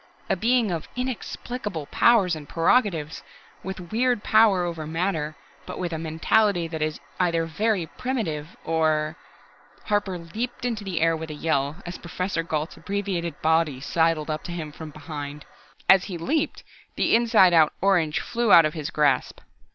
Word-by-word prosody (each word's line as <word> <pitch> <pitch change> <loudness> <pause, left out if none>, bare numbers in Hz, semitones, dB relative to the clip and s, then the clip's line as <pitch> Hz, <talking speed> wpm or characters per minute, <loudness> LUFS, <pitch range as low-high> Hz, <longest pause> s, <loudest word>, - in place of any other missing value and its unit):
A - - +3
Being 235 -2 +2
of 165 -3 -4
inexplicable 245 - -4
powers 195 -1 +3
and 150 -2 -10
prerogatives, 165 -4 +1 0.4
with 185 -2 -7
weird 240 0 +1
power 215 -4 +4
over 165 -3 -4
matter, 160 -2 -2 0.3
but - - -6
with 175 -2 -3
a 160 - -3
mentality 170 +3 +1
that 160 -1 -5
is 155 -1 -1 0.2
either 170 -2 +1
very 200 +2 0
primitive, 170 - -4
or 155 -1 +1 0.4
" - - -28
Harper 205 -3 0
leaped 220 +10 -5
into 225 -4 -2
the 185 -5 -2
air 165 0 +3
with 160 0 -6
a 150 - -6
yell, 150 +2 -1
as 175 +1 -6
Professor 180 0 -3
Gault's 160 -1 -3
abbreviated 190 -6 -3
body 160 -4 +2
sidled 160 +2 +1
up 155 - -3
to - - -5
him 160 -3 -5
from 155 +1 -9
behind. 150 -1 -7 0.4
As 190 -1 +6
he 185 -4 -5
leaped, 305 - -1 0.3
the - - +1
inside 225 -6 +5
out 160 -2 +5
orange 175 -6 +2
flew 235 -2 0
out 165 -2 +9
of 155 - -1
his 155 -3 -4
grasp. 150 -2 +1
170 Hz, 165 wpm, -25 LUFS, 155-205 Hz, 0.4 s, out